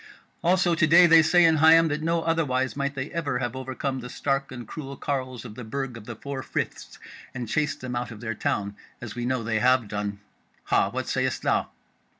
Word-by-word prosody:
Also 175 0 +3
to 160 -1 +3
day 175 +3 +8
they 165 -1 +7
say 175 +2 +5
in 160 -1 +4
Higham 165 +2 +6
that 150 +1 -2
no 165 +1 0
otherwise 130 -6 0
might 140 0 -2
they 135 +1 -4
ever 145 -7 -2
have 120 0 -3
overcome 130 +1 -3
the 125 0 -8
stark 135 +1 -2
and 120 -3 -8
cruel 140 -3 -7
carles 130 -4 -3
of 110 - -8
the 125 - -8
Burg 130 +2 -4
of 115 -2 -10
the 120 - -7
Four 140 +3 -6
Friths - - -5 0.4
and 125 -2 -4
chased 150 +6 -1
them 125 -1 -5
out 120 0 -3
of 110 -3 -10
their 115 0 -3
town, 100 -1 -2 0.2
as 115 -3 -7
we 120 -1 -4
know 130 -1 -1
they 110 0 0
have 125 -1 +3
done. 100 -1 -4 0.4
Hah! - - +2
what - - -4
sayest - - -1
thou?" - - +1
130 Hz, 215 wpm, -26 LUFS, 120-155 Hz, 0.4 s, day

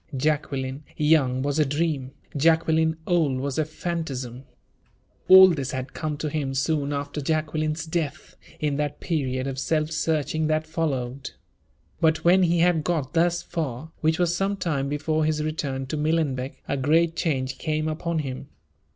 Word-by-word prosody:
Jacqueline, 140 -1 -1
young, 140 -4 +3
was 145 +2 0
a - - +6
dream; 145 -2 -1 0.3
Jacqueline, 160 +1 +3
old, 160 -7 +2
was 140 +2 -2
a 155 - +2
fantasm. 140 -6 -4 0.8
All 190 0 +10
this 140 -6 -2
had 130 0 -4
come 155 -2 -3
to 155 - -3
him 140 -3 -2
soon 145 +1 0
after 145 +1 -3
Jacqueline's 155 +1 -1
death, 160 -3 -3 0.2
in 145 -2 0
that 145 -1 -2
period 130 -6 -1
of 135 -1 -3
self 155 +2 0
searching 155 -1 0
that 155 0 +1
followed. 140 -5 -2 0.7
But, 160 -1 +2
when 180 +2 +6
he 170 -1 +3
had 170 -3 +3
got 155 -5 -1
thus 175 +1 +2
far, 155 -1 -4
which 160 0 +2
was 175 -1 +1
some 195 +2 0
time 150 -7 -1
before 155 +2 0
his 155 0 0
return 140 -4 -3
to 145 +4 -4
Millenbeck, 150 -4 -1
a 140 - -1
great 160 +5 +2
change 130 -5 -1
came 155 -1 -1
upon 165 +2 -2
him. 130 +1 -6
155 Hz, 160 wpm, -25 LUFS, 135-160 Hz, 0.8 s, All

